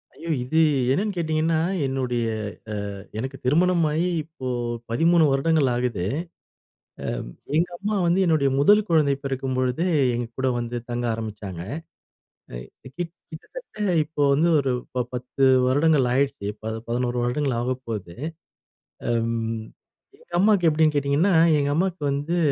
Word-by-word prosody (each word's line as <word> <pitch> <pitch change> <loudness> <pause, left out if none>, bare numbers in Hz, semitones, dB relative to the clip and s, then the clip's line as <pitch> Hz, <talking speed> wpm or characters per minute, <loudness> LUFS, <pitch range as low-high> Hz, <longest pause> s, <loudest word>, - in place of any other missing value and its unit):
ஐயோ! 170 - -8
இது 155 +6 +1 0.3
என்னன்னு 200 +8 0
கேட்டிங்கன்னா, 160 -1 +1 0.3
என்னுடைய 125 -3 -1 0.7
அ 100 - -10
எனக்கு 130 +4 -4
திருமணம் 170 +5 +3
ஆயி, 165 +4 +1 0.2
இப்போ 155 -4 -8 0.4
13 165 +7 +4
வருடங்கள் 140 0 +2
ஆகுது. 120 -7 -1 1.4
அ - - -13
எங்க 175 +2 +1
அம்மா 210 +2 -1
வந்து 175 +3 +3
என்னுடைய 155 -4 +3
முதல் 205 +9 +5
குழந்தை 155 -4 +3
பிறக்கும்பொழுது, 130 +1 -1 0.3
எங்க 120 0 -2
கூட 130 0 +1
வந்து 120 0 -4
தங்க 120 0 -2
ஆரம்பிச்சாங்க. 105 -5 -6 0.9
அ - - -5 0.4
கிட் 170 -2 -4 0.2
கிட்டத்தட்ட - - -11 0.3
இப்போ 150 -1 -5
வந்து 160 +5 +3
ஒரு 135 -2 0 0.2
ப 125 -1 0
10 125 +2 -3 0.2
வருடங்கள் 145 0 +3
ஆயிடுச்சு. 140 -3 0
இப்போ 110 +1 -9 0.2
11 120 +1 -1
வருடங்கள் 125 +1 0
ஆகப்போகுது. 115 -8 -4 0.9
அம், 115 -1 -1 0.6
எங்க 485 - -21
அம்மாவுக்கு 200 -3 +4
எப்படின்னு 155 0 +3
கேட்டிங்கன்னா? 145 +7 +2 0.2
எங்க 145 0 0
அம்மாவுக்கு 180 -1 -1
வந்து, 145 +5 -1
140 Hz, 130 wpm, -24 LUFS, 125-165 Hz, 1.4 s, முதல்